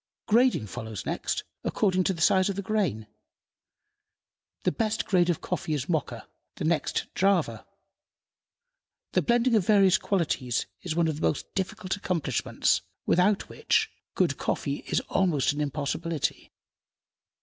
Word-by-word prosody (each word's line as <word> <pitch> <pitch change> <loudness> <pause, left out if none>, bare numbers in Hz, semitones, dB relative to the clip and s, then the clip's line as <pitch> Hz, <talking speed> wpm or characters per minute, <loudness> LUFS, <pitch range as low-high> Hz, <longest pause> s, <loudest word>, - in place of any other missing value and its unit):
Grading 240 - +3
follows 110 -1 -6
next, - - -2 0.2
according 185 -3 +1
to 190 - +2
the 160 - -1
size 190 +2 +4
of 195 - -2
the 200 - -3
grain. 190 - 0 1.6
The - - +2
best 220 +7 -1
grade 180 -3 +3
of 170 - 0
coffee 155 - -2
is 140 -2 -3
Mocha, 160 -4 -2 0.3
the - - -5
next 160 -2 0
Java. 195 -1 +1 1.4
The - - +2
blending 240 +1 +2
of 210 -5 +3
various 195 -2 +5
qualities 145 - 0 0.2
is 170 -3 -3
one 170 -1 +2
of 155 -2 -2
the - - +1
most - - -3
difficult 190 0 -2
accomplishments, 165 - 0 0.2
without 190 +3 +3
which, - - +1 0.2
good - - +1
coffee - - -1
is - - +1
almost 170 -8 +1
an 150 - -3
impossibility. 150 +2 -2
180 Hz, 140 wpm, -27 LUFS, 150-200 Hz, 1.6 s, various